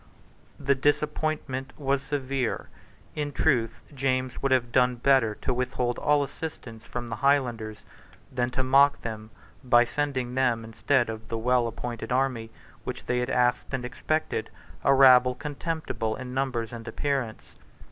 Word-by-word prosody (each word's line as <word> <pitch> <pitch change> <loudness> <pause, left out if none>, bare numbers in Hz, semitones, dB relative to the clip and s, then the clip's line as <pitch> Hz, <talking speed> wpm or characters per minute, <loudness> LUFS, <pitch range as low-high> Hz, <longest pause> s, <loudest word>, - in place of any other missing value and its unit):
The 140 -1 +3
disappointment 145 -1 -1
was 140 -1 0
severe. 135 -3 -2 0.4
In 145 -1 -3
truth 120 -7 +1
James 130 -1 -1
would 135 - 0
have 120 -2 +2
done 125 0 +3
better 120 -3 +3
to 130 - -2
withhold 125 -1 -1
all 145 -1 +3
assistance 125 -7 -7
from 120 0 -5
the 115 -1 -4
Highlanders 120 -6 0 0.5
than 125 -1 0
to 130 +1 -1
mock 140 +2 +5
them 110 -2 -6 0.3
by 120 -1 +5
sending 130 -1 -2
them, 125 -3 +1
instead 120 +3 +1
of 110 0 -6
the 115 - -3
well 120 +1 +2
appointed 115 0 -5
army 125 -3 0 0.3
which - - -6
they 125 0 0
had 125 +1 -1
asked 125 +2 +1
and 125 -1 -4
expected, 155 +5 -2 0.3
a - - +4
rabble 130 -2 +7
contemptible 145 -6 -3
in 125 -1 -7
numbers 125 -4 -2
and 115 0 -8
appearance. 130 -1 -3
125 Hz, 145 wpm, -27 LUFS, 120-135 Hz, 0.5 s, rabble